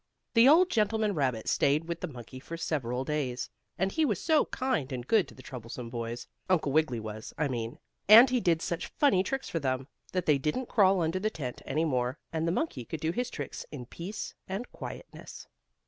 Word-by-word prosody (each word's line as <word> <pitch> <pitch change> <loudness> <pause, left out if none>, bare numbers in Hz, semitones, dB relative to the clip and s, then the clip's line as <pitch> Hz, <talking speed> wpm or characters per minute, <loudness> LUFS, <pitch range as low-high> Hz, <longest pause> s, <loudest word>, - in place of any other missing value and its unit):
The 235 +2 +7
old 350 +4 +6
gentleman 215 -1 +2
rabbit 130 -8 -1
stayed 150 +4 +2
with 170 -1 -3
the 180 - -2
monkey 130 -3 -9
for 165 +5 -7
several 130 -6 -2
days, 135 -5 -2 0.3
and 190 +2 +1
he 320 - +1
was 215 - +1
so 315 -2 +3
kind 255 - -1
and 125 -2 -4
good 215 - +3
to - - -14
the 130 - -13
troublesome 120 -1 -7
boys 120 0 -4 0.2
Uncle 165 -6 +2
Wiggily 145 -5 +2
was, 110 0 -7
I 150 - +1
mean 120 0 -4 0.3
and 225 +5 +10
he 255 -1 +1
did 170 -6 +2
such 170 0 -2
funny 275 -11 +3
tricks 270 +7 -3
for 165 - -2
them, 130 -2 -1 0.2
that 185 -2 -1
they 145 -3 +4
didn't 155 - -2
crawl 195 -4 +4
under 165 +3 0
the 215 +3 0
tent 135 - -6
any 155 +4 +1
more, 125 -2 0 0.2
and 160 0 0
the - - +2
monkey 185 - -2
could 155 +7 -6
do 160 +2 0
his 245 +7 -2
tricks - - -6
in 130 -5 -7
peace 175 - -6
and 195 +6 -4
quietness. - - -9
160 Hz, 210 wpm, -30 LUFS, 130-205 Hz, 0.3 s, and